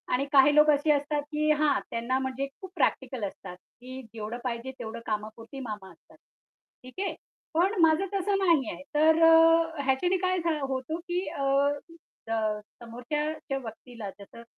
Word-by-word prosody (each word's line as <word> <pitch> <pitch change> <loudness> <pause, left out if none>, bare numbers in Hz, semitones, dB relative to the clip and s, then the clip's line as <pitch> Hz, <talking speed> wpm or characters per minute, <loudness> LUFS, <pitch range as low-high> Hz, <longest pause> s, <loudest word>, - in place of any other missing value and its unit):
आणि 270 +2 0
काही 280 +1 +7
लोक 300 0 +6
असे 290 +1 +2
असतात 290 0 +1
की 305 0 0
हां, 300 -2 +3
त्यांना 235 +3 -1
म्हणजे 265 +1 -3
खूप 380 -1 -9
प्रॅक्टिकल 260 -8 0
असतात, 185 -1 -10
की 255 +7 -11
जेवढं 220 +1 -5
पाहिजे 245 +1 -3
तेवढं 225 +1 -6
कामापुरती 220 +4 -5
मामा 210 -6 -6
असतात. - - -22 0.7
ठीक 255 +8 -12
आहे. - - -3 0.4
पण 360 +6 +2
माझं 325 +4 +4
तसं 395 +1 +1
नाहीये. 300 - +1
तर 315 +1 +5 0.7
ह्याच्याने 355 +8 +2
काय 370 0 0
झा 335 -2 0
होतो, 265 +4 -3
की 355 +2 -3
अ, 280 - -4 0.9
अ, 215 -1 0 0.2
समोरच्या 275 +5 -3
व्यक्तीला 230 -3 -8
जसं 215 +3 -12
270 Hz, 150 wpm, -28 LUFS, 230-315 Hz, 0.9 s, काही